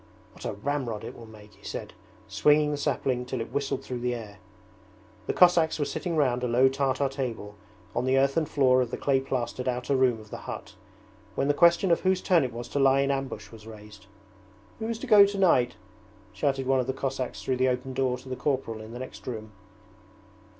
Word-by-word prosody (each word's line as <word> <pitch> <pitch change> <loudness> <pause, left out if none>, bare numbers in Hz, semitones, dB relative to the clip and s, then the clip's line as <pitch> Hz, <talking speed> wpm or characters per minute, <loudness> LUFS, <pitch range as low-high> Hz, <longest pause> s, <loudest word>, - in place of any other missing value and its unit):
'What - - -12
a - - -2
ramrod 120 0 -3
it - - -7
will 115 - -11
make,' 105 -1 -15
he - - -23
said, - - -6 0.3
swinging 150 0 +3
the 145 - -2
sapling 130 -3 -1
till 125 0 -4
it 115 - -5
whistled 140 +1 -2
through 125 -1 -5
the 125 0 -1
air. 105 -3 -9 0.9
The - - 0
Cossacks 175 -3 +4
were 145 - 0
sitting 170 +2 -3
round 125 -4 +2
a - - +1
low 125 +3 +4
Tartar 135 +1 0
table 125 -6 -5 0.4
on 120 - 0
the 130 +1 +2
earthen 140 +4 +2
floor 130 -3 +3
of 125 - -1
the - - -4
clay 135 -2 +2
plastered 130 -1 -3
outer 125 +2 0
room 130 -3 +2
of 110 0 -15
the - - -5
hut, - - -7 0.6
when 135 - 0
the - - +4
question 170 +4 +4
of 170 - +4
whose 185 0 +1
turn 175 -5 +3
it 125 - -2
was 120 +1 -7
to 145 - -2
lie 135 0 +4
in 140 0 +1
ambush 135 -6 -4
was 110 -1 -13
raised. 105 -3 -12 0.7
'Who 220 - -3
is 230 -1 -2
to 255 - -7
go 210 -5 +8
tonight?' 185 -12 +2 0.6
shouted 135 -1 -1
one 135 0 +2
of 125 - -1
the 130 - -1
Cossacks 135 -1 -4
through 130 - -1
the 130 +1 +3
open 125 +1 -3
door 130 -1 0
to - - -15
the 130 - -4
corporal 130 -6 -2
in 110 +1 -10
the - - -6
next 130 - -9
room. 110 -3 -6
130 Hz, 215 wpm, -27 LUFS, 120-140 Hz, 0.9 s, go